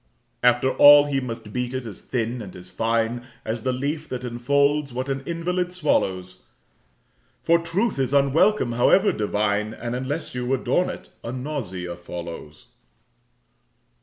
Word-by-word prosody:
After 125 Hz, +2 st, +3 dB
all 145 Hz, 0 st, +8 dB
he 140 Hz, -2 st, 0 dB
must 115 Hz, -4 st, -7 dB
beat 125 Hz, 0 st, -2 dB
it 130 Hz, -1 st, -4 dB
as 105 Hz, -5 st, -8 dB
thin 120 Hz, 0 st, -3 dB
and 100 Hz, -4 st, -9 dB
as 90 Hz, 0 st, -11 dB
fine 115 Hz, +2 st, 0 dB, 0.2 s
As 110 Hz, +1 st, -3 dB
the 130 Hz, -, 0 dB
leaf 145 Hz, +5 st, -3 dB
that 125 Hz, -1 st, -5 dB
enfolds 140 Hz, +4 st, +1 dB
what 130 Hz, +3 st, -4 dB
an 135 Hz, 0 st, -2 dB
invalid 180 Hz, +1 st, -1 dB
swallows, 95 Hz, -, -1 dB, 1.0 s
For 170 Hz, 0 st, +4 dB
truth 170 Hz, +3 st, -1 dB
is 130 Hz, -1 st, 0 dB
unwelcome, 140 Hz, -, +3 dB
however 155 Hz, -, +4 dB
divine, 105 Hz, 0 st, -1 dB
And 120 Hz, 0 st, -4 dB
unless 145 Hz, +5 st, -4 dB
you 125 Hz, 0 st, -3 dB
adorn 130 Hz, +7 st, 0 dB
it, -, -, -8 dB
a 115 Hz, -, -4 dB
nausea 115 Hz, -, -5 dB
follows. 85 Hz, -3 st, -8 dB
125 Hz, 145 wpm, -24 LUFS, 115-145 Hz, 1.0 s, all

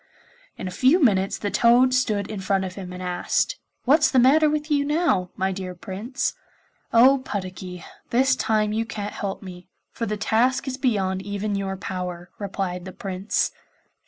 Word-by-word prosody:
In -, -, -5 dB
a -, -, -4 dB
few 260 Hz, -, +4 dB
minutes 195 Hz, -, +2 dB
the 205 Hz, -, -3 dB
toad 240 Hz, +5 st, +5 dB
stood 215 Hz, -6 st, +1 dB
in 215 Hz, -2 st, -5 dB
front 190 Hz, 0 st, 0 dB
of 185 Hz, -, -6 dB
him 185 Hz, -2 st, -8 dB
and 180 Hz, 0 st, -7 dB
asked, 180 Hz, -, 0 dB, 0.3 s
'What's 290 Hz, +6 st, +5 dB
the 265 Hz, -, +1 dB
matter 290 Hz, +5 st, +6 dB
with 300 Hz, +1 st, -2 dB
you 285 Hz, -1 st, +3 dB
now, 295 Hz, -, +1 dB
my 190 Hz, +1 st, 0 dB
dear 185 Hz, -1 st, -5 dB
Prince?' 210 Hz, +9 st, -3 dB, 0.6 s
'Oh, 260 Hz, +4 st, +6 dB
Puddocky, 185 Hz, -6 st, -6 dB, 0.2 s
this 260 Hz, +2 st, +3 dB
time 215 Hz, -1 st, +1 dB
you 225 Hz, +1 st, 0 dB
can't 210 Hz, -2 st, -5 dB
help 195 Hz, -1 st, -4 dB
me, 180 Hz, -2 st, -10 dB, 0.2 s
for 230 Hz, -, -4 dB
the 210 Hz, +1 st, -2 dB
task 240 Hz, +6 st, +1 dB
is 255 Hz, -1 st, -3 dB
beyond 195 Hz, -8 st, 0 dB
even 205 Hz, +1 st, -3 dB
your 195 Hz, -1 st, -2 dB
power,' 180 Hz, -2 st, -5 dB
replied 190 Hz, -3 st, -3 dB
the 190 Hz, -, -6 dB
Prince. 195 Hz, +1 st, -1 dB
205 Hz, 175 wpm, -24 LUFS, 190-255 Hz, 0.6 s, matter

